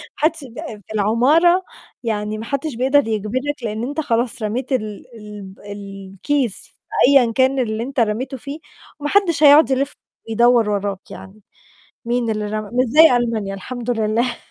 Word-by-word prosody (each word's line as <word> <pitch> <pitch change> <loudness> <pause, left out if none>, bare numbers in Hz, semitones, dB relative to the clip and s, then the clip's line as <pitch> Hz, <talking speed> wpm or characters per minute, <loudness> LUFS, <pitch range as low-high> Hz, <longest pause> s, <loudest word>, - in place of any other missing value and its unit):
حدّش 315 0 0
ب 245 -2 -12 0.3
في 220 - -9
العمارة 285 - +3 0.4
يعني 215 -1 -2
ما 220 - -6
حدّش 280 0 -3
بيقدر 265 +1 +2
يجبرك، 245 +6 -3
لإن 220 +1 -3
أنت 290 +5 -4
خلاص 240 -3 -1
رميت 240 +5 -3
ال 215 -5 -3
الب 205 -3 -10
الكيس 200 +5 -4
في - - -24 0.3
أيًا 265 -5 +5
كان 265 +2 +2
اللي 220 -2 -1
أنت 270 +2 -4
رميته 235 +5 -1
فيه 285 +5 -8 0.4
وما 295 0 -3
حدّش 340 -7 +2
هيقعُد 290 +1 +7
يلِف 270 +2 0 0.3
ويدوَّر 235 -1 +3
وراك 200 -1 -3
يعني، 200 +3 -11 0.6
مين 235 -1 -1
اللي 215 -1 -2
رمى؟ 215 0 -4
مش 250 +1 +2
زي 300 +1 +6
ألمانيا 220 -5 -1
الحمد 245 +4 -6
لله. 230 +2 0
235 Hz, 155 wpm, -20 LUFS, 215-275 Hz, 0.6 s, هيقعُد